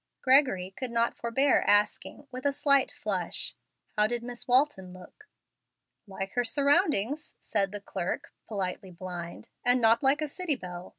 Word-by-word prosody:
Gregory 255 -9 +4
could 255 -2 -4
not 235 0 +1
forbear 265 +4 +2
asking, 205 +7 +1
with 255 0 -7
a 285 - +2
slight 280 -1 +3
flush, - - -3 0.4
"How 210 0 +4
did 240 +1 -3
Miss 240 0 -7
Walton 250 -8 +2
look?" 185 - -15 0.8
"Like 195 0 -6
her 245 - +1
surroundings," 285 - +1
said 200 -3 0
the 205 -1 -6
clerk, 180 -3 -4
politely 190 -2 -4
blind, 175 +3 -8
"and 245 +1 +4
not 230 0 +4
like 285 +2 +3
a - - -1
city 320 0 -1
belle. 180 -5 -8
235 Hz, 155 wpm, -28 LUFS, 195-275 Hz, 0.8 s, Gregory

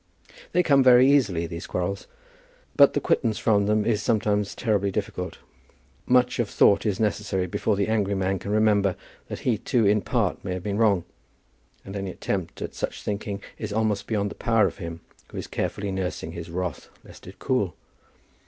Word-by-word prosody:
They 180 - +3
come 140 -4 +4
very 125 0 +7
easily, 95 -13 +2
these 85 +1 -7
quarrels, 95 +2 -3 0.7
but - - +6
the - - +3
quittance 110 -4 +1
from 100 -3 +2
them 105 0 +2
is 110 -3 +1
sometimes 105 -2 0
terribly 105 -4 0
difficult. - - -4 0.7
Much 125 0 +3
of 115 -4 0
thought 100 - +4
is 100 -3 -1
necessary 105 -3 0
before 100 +4 -1
the 100 0 0
angry 105 -2 0
man 95 0 0
can - - -7
remember 105 -3 +3 0.3
that - - -6
he 115 -5 0
too 115 0 +1
in 105 +1 +3
part - - -1
may 95 - -3
have 90 -1 -5
been 100 +1 -2
wrong; 100 -6 +3 0.8
and 95 - -8
any 100 -1 -3
attempt 95 -1 -4
at - - -6
such - - -4
thinking 100 -1 -4 0.2
is 110 -2 -4
almost 105 -2 0
beyond 100 -2 -1
the - - -5
power 115 -3 +2
of 95 - -3
him 85 -2 -6 0.3
who - - -8
is - - -4
carefully 100 -1 -3
nursing 90 -4 -3
his 85 0 -7
wrath, 85 -4 -4
lest - - -15
it - - -11
cool! 105 -10 -1
100 Hz, 185 wpm, -25 LUFS, 95-110 Hz, 0.8 s, very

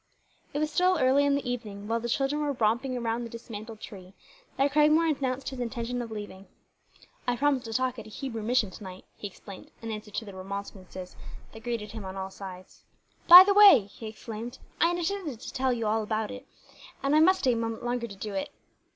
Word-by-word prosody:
It - - -4
was 305 0 0
still 360 +3 +3
early 265 +2 +4
in 280 - +3
the 280 -3 -3
evening, 210 -5 -5
while 230 +1 0
the 235 +1 -4
children 275 +4 0
were 290 -1 0
romping 240 +2 0
around 235 0 -2
the 235 - -6
dismantled 225 -1 -8
tree, 190 -2 -11 0.4
that 275 +1 +2
Cragmore 305 +2 +4
announced 265 -1 -2
his 265 -2 -8
intention 240 0 -3
of 235 - -6
leaving. 205 -3 -8 0.8
"I 245 0 +1
promised 275 -1 +1
to 225 - -5
talk 255 0 0
at 220 - -9
a - - -11
Hebrew 230 0 -5
mission 220 -2 +1
to 210 - -11
night," 185 -1 -10
he 205 - -6
explained, 195 0 -12
in 225 0 -6
answer 215 0 -6
to 210 +2 -4
the 200 - -9
remonstrances 190 -1 -7 0.4
that 220 0 -12
greeted 230 -4 -3
him 220 -1 -7
on 190 0 -7
all 190 0 -5
sides. 185 -1 -10 0.4
"By 355 +2 +13
the 400 +1 +3
way," 400 - +9
he 205 +3 -10
exclaimed, 225 +3 -7 0.2
"I 335 - +5
intended 345 - -2
to - - -8
tell 260 0 +1
you 230 -2 -1
about 215 0 0
that, 255 - -8 0.6
and 275 +2 +2
I - - +6
must 375 +4 +5
stay 255 - +3
a - - -1
moment 230 0 -3
longer 240 -1 -1
to 200 - -10
do 205 +1 -6
it." 195 - -2
235 Hz, 215 wpm, -28 LUFS, 210-270 Hz, 0.8 s, By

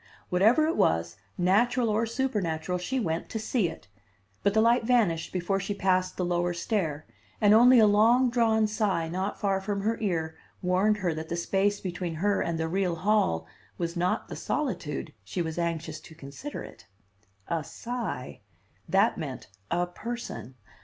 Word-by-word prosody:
Whatever 220 +12 +4
it 325 - 0
was, 85 +1 +2 0.2
natural 235 +7 +3
or 220 +2 +1
supernatural, 185 -9 -1
she 260 +9 -2
went 165 -7 -2
to - - -3
see 220 -3 0
it; - - -11 0.5
but 200 +1 +1
the - - +5
light 230 +2 +4
vanished 220 -9 +2
before 185 +2 -1
she 200 +1 -3
passed 185 -1 +1
the 180 - 0
lower 175 0 0
stair, 165 -6 -2 0.3
and 205 0 +5
only 245 +3 +7
a 220 - +7
long 230 +5 +4
drawn 225 -2 +3
sigh 210 -6 0
not 185 +4 -3
far 195 -1 +1
from 200 0 -2
her 225 +3 0
ear 165 -6 -1 0.2
warned 190 +4 +2
her 180 -5 -1
that 160 0 -6
the 170 - -1
space 195 +4 +1
between 175 -2 -4
her 200 +5 +1
and 170 -1 -1
the 160 0 -1
real 180 0 0
hall 175 - +1 0.3
was 170 -1 -3
not 180 +1 0
the - - -7
solitude 255 - -3
she 100 - -5
was 160 +1 -4
anxious 165 -2 -2
to 160 - -14
consider 155 - -7
it. - - -13 0.6
A 165 -2 -1
sigh! 225 - -5 0.5
That - - +3
meant - - -6 0.2
a 175 +1 +1
person. 210 - -7
190 Hz, 170 wpm, -28 LUFS, 170-220 Hz, 0.6 s, only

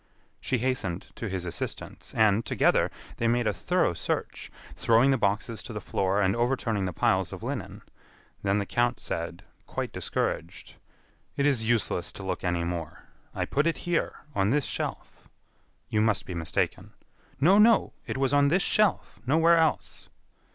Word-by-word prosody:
She 130 - -1
hastened 115 -8 -2
to 115 - -5
his 95 -1 -3
assistance, 85 - -5
and, 110 0 +4
together, - - +2 0.3
they 115 - 0
made 120 +1 +2
a 105 - +1
thorough - - +1
search, - - -3 0.3
throwing 115 +4 +4
the - - +4
boxes 105 +2 0
to - - -8
the - - -4
floor 95 +2 0
and 95 +2 +2
overturning 120 -4 0
the 90 - -2
piles - - +1
of - - -8
linen. - - -5 0.6
Then 100 +1 +1
the 100 - -1
count 120 +4 0
said, 85 +1 -4 0.2
quite - - -4
discouraged: - - -3 0.6
"It 140 - +2
is 120 -6 +2
useless 110 -6 +1
to 100 - -9
look 95 -1 -3
any 85 -1 0
more. 85 -2 -5 0.3
I - - -1
put 145 +4 +1
it 165 - 0
here, 175 -1 0 0.2
on 100 -3 +1
this 140 +3 +1
shelf." - - -5 0.6
"You 105 - +1
must 110 -2 +1
be 90 - -6
mistaken." 80 -2 -2 0.5
"No, 185 +9 +5
no, 225 0 +5
it - - -3
was 135 0 +1
on 145 0 +5
this 175 +6 +2
shelf 210 - +1
nowhere 165 +4 +5
else." 160 -1 0
115 Hz, 165 wpm, -27 LUFS, 95-140 Hz, 0.6 s, No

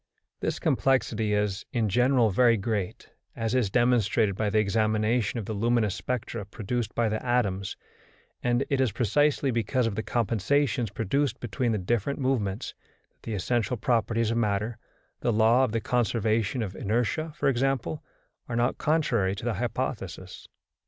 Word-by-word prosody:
This - - -2
complexity 115 -5 +1
is, 105 -1 -1
in 115 -4 +1
general, 125 +1 +3
very 115 +3 +4
great, 100 -2 -3 0.2
as 115 0 -2
is 125 -6 +2
demonstrated 115 -3 +2
by 105 +1 0
the 110 - +1
examination 110 +2 +1
of 110 - -3
the 110 - -4
luminous 115 -1 +1
spectra 115 -1 -3
produced 110 +3 -4
by 120 -1 +2
the 110 0 -2
atoms, 100 -6 0 0.6
and 120 +2 +1
it 135 -1 +2
is 130 -5 +2
precisely 140 +6 +2
because 120 +2 0
of 115 - -1
the 110 - -2
compensations 120 +2 0
produced 115 +5 -1
between 120 +1 -1
the 110 - +1
different 115 +7 -1
movements 125 -6 -1 0.4
that - - -44
the 115 - -4
essential 120 +4 0
properties 115 0 +1
of 115 - 0
matter 110 +1 -1 0.4
the 120 - 0
law 115 +3 +4
of 130 - +1
the 115 - 0
conservation 115 -1 0
of 95 -2 -6
inertia, 120 +9 -1
for - - 0
example 135 +3 0 0.5
are 120 - -2
not 120 +1 +1
contrary 125 -12 +1
to 105 - -7
the 120 - 0
hypothesis. 110 -6 -4
115 Hz, 160 wpm, -27 LUFS, 105-125 Hz, 0.6 s, very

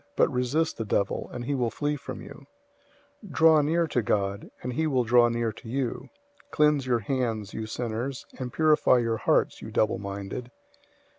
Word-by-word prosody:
But - - +3
resist 130 +6 0
the 115 - -2
devil, 100 -1 -1
and 120 -1 -6
he 145 - -1
will 125 -4 0
flee 150 +4 -2
from 145 - -8
you. 140 - -12 0.8
004:008 200 - -11
Draw 160 -1 +5
near 165 +3 +2
to 130 -6 0
God, 100 -1 -1
and 125 0 -3
he 160 +4 0
will 130 -4 +2
draw 120 +1 +5
near 115 -1 -1
to 115 - -12
you. 130 -1 -2 0.4
Cleanse 150 - +2
your 120 -2 +2
hands, 115 -4 -2
you 110 -1 -4
sinners; 120 +3 -4
and 125 -1 -4
purify 155 -4 +4
your 115 -2 0
hearts, - - +1
you - - -7
double 110 - +1
minded. 100 +4 -6
125 Hz, 180 wpm, -27 LUFS, 115-145 Hz, 0.8 s, Draw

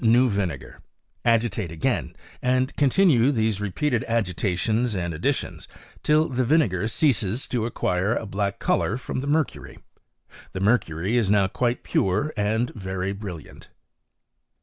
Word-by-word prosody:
new 120 +3 +5
vinegax; 95 - -3 0.4
agitate 115 -6 +1
again, 80 -1 -1 0.3
and 130 +1 +1
continue 145 -3 +4
these 110 -5 0
re^ 105 -2 -3
peated 125 +1 0
agitations 110 +2 0
and 85 -2 -2
additions 75 - -2 0.3
till 155 +1 +3
the 130 -1 -1
vinegar 115 - +2
ceases 115 -3 0
to 115 -3 -1
acquire 95 -1 0
a - - -3
black 100 -1 -2
colour 110 - 0
from 130 0 -4
the 135 - -4
mercury: 155 +1 -1 0.8
the 95 - -4
mer 110 +6 +4
cury 85 +7 -4
is 110 -5 +2
now 100 -1 +4
quite 120 +5 -1
pure 105 +11 0
and 110 +4 0
very 95 -1 -3
brilliant. 95 -6 -9
110 Hz, 140 wpm, -24 LUFS, 95-125 Hz, 0.8 s, new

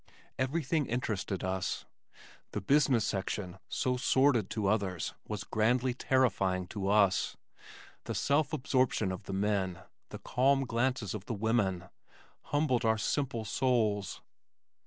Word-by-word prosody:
Everything 145 +2 0
interested 105 -5 -2
us. 95 0 -2 0.7
The - - -1
business 135 0 +3
section 95 -1 -3
so 125 0 0
sordid 130 -5 +3
to 105 -3 -2
others 95 -4 0
was 105 -2 -4
grandly 120 +4 +1
terrifying 100 -8 +1
to 100 -2 -3
us. 100 -3 +3 0.7
The - - -3
self 145 +1 +2
absorption 130 - +1
of 95 +2 -6
the 95 - -5
men, 95 -3 0 0.3
the - - -7
calm 135 +2 +2
glances 120 -3 -1
of 105 -2 -6
the 115 - -2
women 100 -4 +1 0.6
humbled 145 -4 +1
our 110 -1 +3
simple 115 0 -1
souls. 110 -4 0
110 Hz, 125 wpm, -31 LUFS, 100-130 Hz, 0.7 s, business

